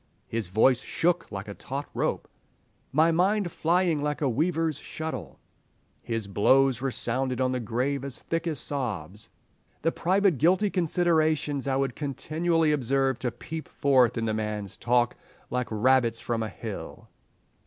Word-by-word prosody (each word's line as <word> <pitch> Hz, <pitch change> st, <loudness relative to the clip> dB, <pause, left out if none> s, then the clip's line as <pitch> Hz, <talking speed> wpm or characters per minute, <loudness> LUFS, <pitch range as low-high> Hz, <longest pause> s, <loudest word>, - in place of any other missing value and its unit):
"His 110 Hz, -5 st, -3 dB
voice 120 Hz, +6 st, +4 dB
shook 175 Hz, +1 st, 0 dB
like 100 Hz, -1 st, -5 dB
a 100 Hz, -, -6 dB
taut 140 Hz, +7 st, -5 dB
rope." -, -, -1 dB, 0.6 s
"My 160 Hz, +4 st, +4 dB
mind 185 Hz, +2 st, +2 dB
flying 170 Hz, -2 st, +1 dB
like 150 Hz, 0 st, -1 dB
a 145 Hz, -, +1 dB
weaver's 160 Hz, +4 st, 0 dB
shuttle." 160 Hz, 0 st, -6 dB, 0.6 s
"His 115 Hz, -3 st, -3 dB
blows 130 Hz, +5 st, +3 dB
resounded 130 Hz, -1 st, -1 dB
on 130 Hz, -1 st, +2 dB
the 130 Hz, -, -1 dB
grave 125 Hz, +4 st, -1 dB
as 140 Hz, -2 st, -2 dB
thick 165 Hz, +1 st, -2 dB
as 155 Hz, -3 st, -1 dB
sobs." 105 Hz, -, -3 dB, 0.5 s
"The 165 Hz, -, +3 dB
private 185 Hz, -4 st, +2 dB
guilty 185 Hz, +6 st, +3 dB
considerations 160 Hz, -5 st, +1 dB
I 135 Hz, -, +1 dB
would 135 Hz, -2 st, 0 dB
continually 160 Hz, +3 st, 0 dB
observe 135 Hz, -2 st, +1 dB
to 125 Hz, -, -1 dB
peep 160 Hz, +6 st, -7 dB
forth 130 Hz, -4 st, +3 dB
in 115 Hz, -, -1 dB
the 110 Hz, -, 0 dB
man's 105 Hz, -2 st, -3 dB
talk 120 Hz, -1 st, +1 dB, 0.4 s
like 125 Hz, -1 st, -1 dB
rabbits 115 Hz, +1 st, +2 dB
from 115 Hz, 0 st, -2 dB
a 110 Hz, -, -2 dB
hill." 110 Hz, -3 st, -8 dB
135 Hz, 150 wpm, -27 LUFS, 115-160 Hz, 0.6 s, voice